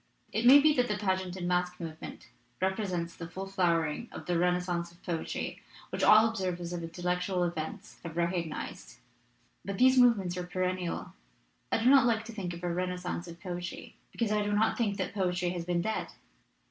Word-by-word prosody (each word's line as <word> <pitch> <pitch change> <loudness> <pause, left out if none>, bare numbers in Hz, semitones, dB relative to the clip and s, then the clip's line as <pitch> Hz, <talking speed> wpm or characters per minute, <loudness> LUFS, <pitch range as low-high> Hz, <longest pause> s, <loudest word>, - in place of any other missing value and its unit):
"It 225 +3 +2
may 275 +3 +10
be 305 +1 +5
that 250 -3 +2
the 210 - -1
pageant 190 -3 -1
and 180 -2 -3
masque 180 0 0
move 160 -2 -7
ment - - -9 0.3
represents 185 -3 -1
the 165 - -7
full 190 +2 -5
flowering 175 0 0
of - - -8
the 180 - -1
renas 180 +1 +2
cence 170 -1 -2
of 175 - -23
poetry 170 -2 -3 0.3
which - - -3
all 215 +1 +7
observers 180 -5 -3
of 175 - -3
intellectual 180 +2 -1
events 175 +5 -4
have 170 -1 -7
recognized. 170 - -3 0.7
But 200 -1 -4
these 260 +1 +6
movements 200 -8 +4
are 180 0 -4
perennial; 185 -1 -2 0.6
I 225 - +1
do - - +3
not 270 -3 +7
like 225 -1 +1
to 230 - -8
think 190 -5 -4
of 170 - -11
a - - 0
renas 180 +1 -2
cence 180 0 -3
of 170 0 -10
poetry 175 0 -6 0.2
because 230 -3 -1
I 210 0 +2
do 205 0 -1
not 215 +2 +3
think 205 -4 0
that - - -3
poetry 180 -2 0
has 175 -2 -4
been 175 -1 0
dead. 220 +2 -2
180 Hz, 200 wpm, -30 LUFS, 175-205 Hz, 0.7 s, may